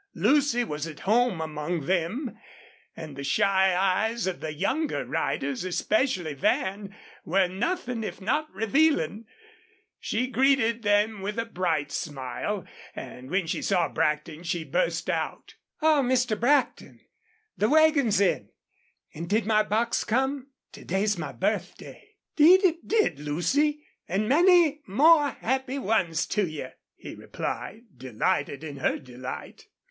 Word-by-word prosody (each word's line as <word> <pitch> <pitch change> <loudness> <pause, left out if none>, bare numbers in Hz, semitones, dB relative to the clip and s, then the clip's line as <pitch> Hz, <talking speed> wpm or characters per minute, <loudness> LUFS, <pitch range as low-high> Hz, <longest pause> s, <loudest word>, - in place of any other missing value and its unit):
Lucy 280 -4 +2
was 150 -7 -4
at 155 -3 -10
home 230 -2 +2
among 155 +1 -3
them, 190 - -1 0.6
and 155 -3 -8
the 140 - -6
shy 190 +5 +2
eyes 195 +5 +1
of 185 -2 -3
the 155 - -4
younger 240 - -1
riders, 140 +2 -2
especially 185 - 0
Van, 195 +8 -1 0.3
were 190 -1 +2
nothing 245 - -3
if - - -6
not 295 +10 -1
revealing. 225 - +1 0.7
She 245 +3 -1
greeted 255 -3 +2
them 205 0 +1
with 205 +3 -4
a 230 - -1
bright 165 -9 -1
smile, 135 -5 -4 0.3
and 130 +1 -9
when 185 +1 0
she 165 - -3
saw 180 -4 +1
Brackton 150 +1 -1
she 170 -1 -3
burst - - -1
out: - - -3 0.3
"Oh, 310 -2 +5
Mr. 250 -2 +1
Brackton, 270 +3 +1 0.5
the 210 - +1
wagon's 305 -9 +4
in, 200 -2 +1 0.6
and 170 +2 -7
did 215 +2 +1
my 215 -1 +3
box 220 +3 0
come?... 265 +3 -1 0.2
To - - -12
day's 200 +3 0
my - - -4
birthday." 430 0 -4 0.2
"'Deed 355 +6 +7
it 340 -2 0
did, 425 - +1
Lucy; 270 - 0 0.2
an' 200 +4 -1
many 325 - +4
more 295 - +5
happy 265 +2 -2
ones 190 -10 0
to 205 -3 0
you!" 155 -5 -6 0.3
he - - -10
replied, 220 +4 -6 0.2
delighted 130 +4 -1
in 145 -3 -7
her - - 0
delight. 130 0 -9
210 Hz, 135 wpm, -26 LUFS, 165-265 Hz, 0.7 s, Deed